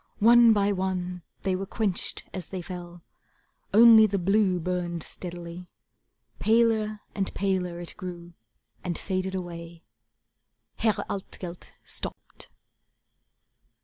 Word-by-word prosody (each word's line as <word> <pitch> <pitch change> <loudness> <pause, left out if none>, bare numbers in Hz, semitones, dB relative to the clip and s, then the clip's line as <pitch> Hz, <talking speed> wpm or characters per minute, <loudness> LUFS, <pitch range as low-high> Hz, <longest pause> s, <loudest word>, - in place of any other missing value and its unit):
One 235 +1 +7
by 205 -1 +3
one 185 -2 -2 0.2
they 190 -2 +1
were 195 +1 -4
quenched 205 -5 -2
as 185 -3 -6
they 185 -2 -5
fell, 175 -1 -8 0.7
Only 220 0 +8
the 200 -1 -1
blue 195 0 +2
burned 175 -1 -2
steadily. 175 0 -7 0.7
Paler 220 -1 +2
and 195 -2 -2
paler 185 -3 -1
it 175 - -6
grew, 175 -1 -7 0.5
and 175 -2 -2
faded 190 0 -2
away. 170 -2 -7 0.9
Herr 220 -3 +1
Altgelt 180 -2 -7
stopped. - - -5
185 Hz, 110 wpm, -27 LUFS, 175-205 Hz, 0.9 s, Only